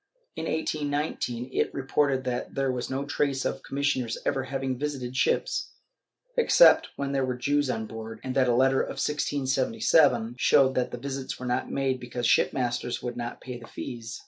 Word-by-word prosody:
In 160 Hz, -, -4 dB
1819 145 Hz, -6 st, -2 dB
it -, -, +1 dB
reported 135 Hz, 0 st, +1 dB
that 125 Hz, -1 st, -3 dB
there 135 Hz, -1 st, +1 dB
was 125 Hz, -1 st, -3 dB
no 135 Hz, +2 st, -2 dB
trace 140 Hz, -2 st, 0 dB
of -, -, -2 dB
commissioners 135 Hz, -4 st, -1 dB
ever 130 Hz, -1 st, 0 dB
having 135 Hz, -1 st, -2 dB
visited 135 Hz, -4 st, -3 dB
ships, 135 Hz, -, 0 dB, 0.6 s
except -, -, +6 dB
when 140 Hz, 0 st, -3 dB
there 135 Hz, -1 st, +1 dB
were 125 Hz, -1 st, -2 dB
Jews 145 Hz, +2 st, +1 dB
on 110 Hz, -3 st, -2 dB
board, 110 Hz, 0 st, -8 dB
and 130 Hz, -, -3 dB
that 130 Hz, -2 st, +3 dB
a 120 Hz, -, +3 dB
letter 130 Hz, +1 st, +4 dB
of -, -, -5 dB
1677 145 Hz, -, +2 dB
showed 135 Hz, -1 st, +5 dB
that 125 Hz, -1 st, 0 dB
visits 135 Hz, +2 st, -5 dB
were 125 Hz, -, -6 dB
not 125 Hz, 0 st, -1 dB
made 135 Hz, -2 st, 0 dB
because 120 Hz, 0 st, -4 dB
shipmasters 120 Hz, 0 st, +1 dB
would 125 Hz, -1 st, -3 dB
not 120 Hz, -1 st, -5 dB
pay 125 Hz, -2 st, -7 dB
the 120 Hz, -, -12 dB
fees.' 115 Hz, -1 st, -7 dB
130 Hz, 170 wpm, -27 LUFS, 125-140 Hz, 0.6 s, except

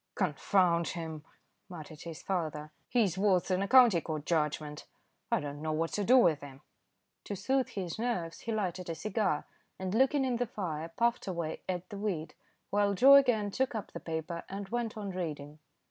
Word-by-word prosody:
"Confound 170 Hz, -4 st, +2 dB
him," 160 Hz, -3 st, -5 dB, 0.5 s
muttered 155 Hz, -3 st, -9 dB
his 165 Hz, -1 st, -8 dB
father. 155 Hz, -5 st, -3 dB, 0.2 s
"He's 200 Hz, -7 st, +2 dB
worse 195 Hz, -3 st, +3 dB
than 185 Hz, 0 st, +1 dB
a 200 Hz, -, 0 dB
county 240 Hz, -9 st, +7 dB
court 155 Hz, -2 st, -4 dB
judgment. 150 Hz, -2 st, -1 dB, 0.4 s
I -, -, +3 dB
don't 145 Hz, 0 st, -6 dB
know 155 Hz, 0 st, -1 dB
what 165 Hz, +1 st, -1 dB
to 205 Hz, -, 0 dB
do 250 Hz, +6 st, +6 dB
with 165 Hz, -, +4 dB
him." 140 Hz, -1 st, -11 dB, 0.6 s
To 205 Hz, -, -4 dB
soothe 265 Hz, +6 st, 0 dB
his 185 Hz, -1 st, -5 dB
nerves 220 Hz, -9 st, -2 dB
he 230 Hz, -, -5 dB
lighted 185 Hz, -5 st, -2 dB
a 165 Hz, -, -2 dB
cigar, 210 Hz, -5 st, -1 dB, 0.3 s
and 185 Hz, 0 st, -3 dB
looking 265 Hz, +4 st, +3 dB
in 250 Hz, -2 st, 0 dB
the 245 Hz, 0 st, -1 dB
fire 165 Hz, -7 st, -4 dB
puffed 235 Hz, +7 st, 0 dB
away 170 Hz, -4 st, -3 dB
at 180 Hz, -1 st, -2 dB
the 200 Hz, -, -6 dB
weed, 170 Hz, -7 st, -3 dB, 0.4 s
while 205 Hz, 0 st, +2 dB
Joe 270 Hz, +8 st, +8 dB
again 245 Hz, -7 st, +5 dB
took 260 Hz, +2 st, -1 dB
up 215 Hz, -, -5 dB
the -, -, -6 dB
paper 165 Hz, +1 st, -4 dB
and 195 Hz, 0 st, -6 dB
went 235 Hz, -2 st, -2 dB
on 205 Hz, -2 st, -4 dB
reading. 150 Hz, -5 st, -5 dB
185 Hz, 185 wpm, -31 LUFS, 160-215 Hz, 0.6 s, Joe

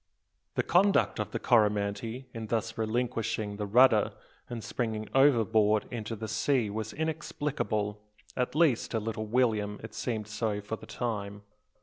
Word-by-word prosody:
The -, -, +1 dB
conduct 195 Hz, +3 st, +3 dB
of -, -, -2 dB
the -, -, -3 dB
Coromantee 110 Hz, +2 st, +1 dB
in 115 Hz, -2 st, -5 dB
thus 115 Hz, 0 st, -1 dB
relinquishing 110 Hz, -2 st, -1 dB
the 105 Hz, -1 st, -3 dB
rudder 115 Hz, -1 st, +5 dB, 0.4 s
and 120 Hz, -2 st, -5 dB
springing 110 Hz, -3 st, -3 dB
overboard 110 Hz, -6 st, +4 dB
into 115 Hz, -2 st, -4 dB
the 110 Hz, +1 st, -5 dB
sea 115 Hz, 0 st, +1 dB
was 110 Hz, +1 st, -4 dB
inexplicable, 145 Hz, -9 st, -2 dB, 0.3 s
at 125 Hz, +2 st, -1 dB
least, 155 Hz, -7 st, +3 dB
to 115 Hz, -, -1 dB
little 110 Hz, 0 st, -4 dB
William 110 Hz, -3 st, +1 dB
it 110 Hz, -, -8 dB
seemed 110 Hz, -4 st, -3 dB
so 110 Hz, -1 st, -2 dB
for 105 Hz, +2 st, -4 dB
the -, -, -13 dB
time. 105 Hz, -4 st, -4 dB
110 Hz, 145 wpm, -29 LUFS, 105-125 Hz, 0.4 s, rudder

